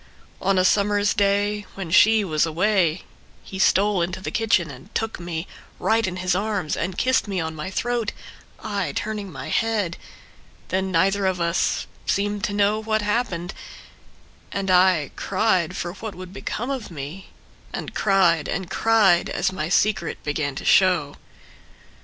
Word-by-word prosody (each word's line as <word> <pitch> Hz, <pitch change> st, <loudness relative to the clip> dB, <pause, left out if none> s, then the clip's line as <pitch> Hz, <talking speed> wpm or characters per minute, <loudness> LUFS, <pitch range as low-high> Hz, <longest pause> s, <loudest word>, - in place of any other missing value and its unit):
On 195 Hz, 0 st, +2 dB
a 185 Hz, -, +3 dB
summer's 205 Hz, +1 st, +3 dB
day 205 Hz, 0 st, +1 dB
when 190 Hz, -4 st, -6 dB
she 220 Hz, +4 st, +6 dB
was 155 Hz, -4 st, +1 dB
away 175 Hz, 0 st, +1 dB, 0.4 s
He 190 Hz, -, -8 dB
stole 200 Hz, 0 st, +3 dB
into 175 Hz, +2 st, -2 dB
the 190 Hz, -, -5 dB
kitchen 210 Hz, -9 st, +1 dB
and 140 Hz, -, -13 dB
took 225 Hz, -2 st, -2 dB
me 170 Hz, -1 st, -4 dB, 0.3 s
Right 225 Hz, -1 st, +1 dB
in 185 Hz, -, -3 dB
his 185 Hz, 0 st, 0 dB
arms 200 Hz, -4 st, -1 dB
and 180 Hz, +2 st, -3 dB
kissed 260 Hz, -3 st, +2 dB
me 195 Hz, -2 st, -2 dB
on 160 Hz, -1 st, -3 dB
my 155 Hz, +4 st, -5 dB
throat, 235 Hz, +2 st, -1 dB, 0.5 s
I 200 Hz, -9 st, -2 dB
turning 210 Hz, -3 st, -3 dB
my 135 Hz, -3 st, -7 dB
head. 210 Hz, -6 st, 0 dB, 0.7 s
Then 190 Hz, 0 st, -1 dB
neither 190 Hz, +3 st, +2 dB
of 185 Hz, -1 st, -1 dB
us 170 Hz, +1 st, 0 dB, 0.2 s
Seemed 205 Hz, +1 st, 0 dB
to 205 Hz, -, -3 dB
know 205 Hz, +1 st, +2 dB
what 220 Hz, -1 st, 0 dB
happened. 205 Hz, -5 st, -1 dB, 1.0 s
And 195 Hz, -1 st, -1 dB
I 180 Hz, -5 st, +4 dB
cried 190 Hz, -4 st, 0 dB
for 175 Hz, 0 st, -4 dB
what 215 Hz, +1 st, -7 dB
would 185 Hz, 0 st, -9 dB
become 240 Hz, +5 st, -4 dB
of 260 Hz, -5 st, -4 dB
me. 160 Hz, +4 st, -8 dB, 0.4 s
And -, -, -6 dB
cried 175 Hz, -6 st, +3 dB
and 190 Hz, 0 st, -3 dB
cried 210 Hz, -6 st, +3 dB
as -, -, 0 dB
my 160 Hz, -4 st, -3 dB
secret 195 Hz, -2 st, +1 dB
began 145 Hz, -2 st, -2 dB
to -, -, -6 dB
show. 180 Hz, -7 st, +3 dB
190 Hz, 160 wpm, -23 LUFS, 170-210 Hz, 1.0 s, she